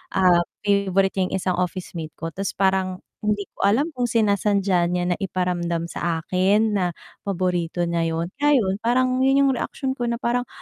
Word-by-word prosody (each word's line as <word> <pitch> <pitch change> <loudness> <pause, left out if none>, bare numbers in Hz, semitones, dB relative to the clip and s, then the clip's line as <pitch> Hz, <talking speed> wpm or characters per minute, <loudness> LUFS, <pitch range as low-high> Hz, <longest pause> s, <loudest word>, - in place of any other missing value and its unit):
um, 180 -2 +5 0.2
favorite 195 -1 +2
nya 185 - +2
yung - - -3
isang 185 -1 -1
officemate 175 -3 -4
ko 165 0 -5
'tas 195 +3 -4
parang 190 -1 0 0.2
hindi 210 -1 0
ko - - 0
alam 275 +11 +2
kung 250 -4 -1
sinasadya 200 -5 +2
niya 180 0 -1
na 175 - 0
iparamdam 175 -3 -2
sa 165 -1 -2
akin 200 +5 +2
na 195 -3 +1 0.4
paborito 175 -2 -1
niya 170 -1 0
yun. 170 +2 -3
Kaya, 295 0 +4
'yun, 195 -6 +1
parang 255 +3 +1
yun 270 +1 +4
yung 275 - +4
reaksyon 265 +1 -3
ko 245 -2 -3
na 235 - 0
parang, 245 +1 -1
190 Hz, 180 wpm, -23 LUFS, 180-230 Hz, 0.4 s, um